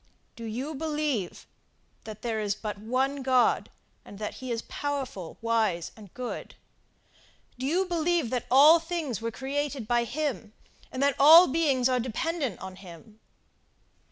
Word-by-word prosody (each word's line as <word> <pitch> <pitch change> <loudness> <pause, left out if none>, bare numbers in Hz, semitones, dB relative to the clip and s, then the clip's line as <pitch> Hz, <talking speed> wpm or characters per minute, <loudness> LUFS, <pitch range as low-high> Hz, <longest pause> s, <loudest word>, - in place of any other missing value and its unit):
Do 230 - -8
you 250 +8 -4
believe 295 - -2 0.6
that 215 -1 -9
there 225 -2 -1
is 205 -2 -1
but 210 -1 -6
one 260 +6 -1
God, 255 -2 +2 0.3
and 200 - -12
that 210 0 -4
he 255 -1 -6
is 230 -1 -2
powerful, 270 - -5
wise, 220 -7 0
and 205 -4 -14
good? 250 -1 -6 1.0
Do 260 - -2
you 360 +6 +1
believe 340 -6 0
that 250 -2 -2
all 295 +6 +8
things 325 - -4
were 230 - -2
created 270 0 -3
by 240 0 +2
him, 255 -4 -3 0.4
and 260 - -2
that 280 0 +3
all 320 +5 +9
beings 275 -5 +2
are 255 -1 +1
dependent 260 - -2
on 190 -1 -8
him? 195 +4 -14
255 Hz, 150 wpm, -27 LUFS, 220-290 Hz, 1.0 s, all